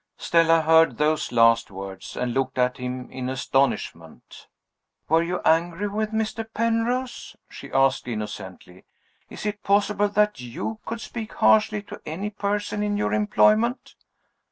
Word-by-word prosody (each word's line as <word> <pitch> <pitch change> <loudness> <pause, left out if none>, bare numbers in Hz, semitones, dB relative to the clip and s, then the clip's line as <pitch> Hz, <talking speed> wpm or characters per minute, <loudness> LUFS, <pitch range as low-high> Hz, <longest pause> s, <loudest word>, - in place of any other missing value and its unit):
Stella 165 -1 +3
heard 160 +1 +4
those 150 0 0
last 115 -1 +4
words, 95 -1 -8
and 125 -1 -2
looked 135 0 -1
at 125 0 +1
him 125 0 -5
in 130 -1 -4
astonishment. 135 +1 -2 0.6
"Were 165 +1 +3
you 175 +2 -2
angry 170 +5 +2
with 215 +1 -2
Mr. 220 0 -2
Penrose?" 230 +3 -1
she - - -11
asked 135 -1 +2
innocently. 95 -5 -7 0.4
"Is - - -9
it 210 0 -3
possible 205 +1 +2
that 210 -4 +1
you 125 - -5
could 230 0 -4
speak 225 -2 -7
harshly 215 -1 +3
to - - -11
any 190 +7 -5
person 205 0 -2
in 205 0 -1
your 205 - -1
employment?" 215 +4 +2
175 Hz, 140 wpm, -24 LUFS, 130-210 Hz, 0.6 s, heard